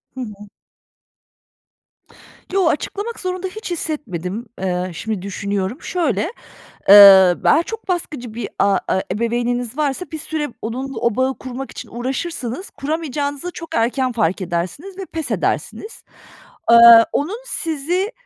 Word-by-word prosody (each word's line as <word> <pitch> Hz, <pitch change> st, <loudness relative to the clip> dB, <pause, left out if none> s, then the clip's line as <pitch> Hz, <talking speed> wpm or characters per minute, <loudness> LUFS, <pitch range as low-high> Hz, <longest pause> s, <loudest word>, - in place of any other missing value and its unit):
Hı 260 Hz, -, -5 dB
hı. 210 Hz, -3 st, -8 dB, 2.1 s
Yo, 385 Hz, -3 st, +3 dB
açıklamak 410 Hz, +8 st, -2 dB
zorunda 370 Hz, 0 st, -3 dB
hiç 400 Hz, 0 st, -7 dB
hissetmedim. 230 Hz, -, -4 dB, 0.2 s
Eee, 180 Hz, -1 st, -2 dB
şimdi 215 Hz, +2 st, -4 dB
düşünüyorum. 200 Hz, -, -3 dB
Şöyle, 290 Hz, -, -1 dB, 0.7 s
eee, 195 Hz, -2 st, +10 dB
be 325 Hz, -, +5 dB
çok 450 Hz, -3 st, -7 dB
baskıcı 295 Hz, -, -3 dB
bir 235 Hz, -, -4 dB
a 200 Hz, -1 st, +3 dB
e 190 Hz, -, +1 dB
ebeveyniniz 240 Hz, +3 st, -2 dB
varsa 295 Hz, +3 st, -1 dB
bir 315 Hz, -, -4 dB
süre 305 Hz, -1 st, -3 dB
onunla 255 Hz, +3 st, -4 dB
o 235 Hz, -1 st, +1 dB
bağı 260 Hz, -1 st, 0 dB
kurmak 260 Hz, +1 st, -7 dB
için -, -, -9 dB
uğraşırsınız, 260 Hz, -, -4 dB
kuramayacağınızı 290 Hz, +1 st, -3 dB
çok 330 Hz, -, -8 dB
erken 250 Hz, +3 st, +1 dB
fark 210 Hz, -5 st, 0 dB
edersiniz 185 Hz, -, -4 dB
ve 385 Hz, -, -4 dB
pes 320 Hz, -3 st, -5 dB
edersiniz. 430 Hz, -, -3 dB, 0.7 s
Eee, 235 Hz, -, +8 dB, 0.4 s
onun 355 Hz, +11 st, -1 dB
sizi, 345 Hz, -, -2 dB
260 Hz, 130 wpm, -19 LUFS, 210-325 Hz, 2.1 s, eee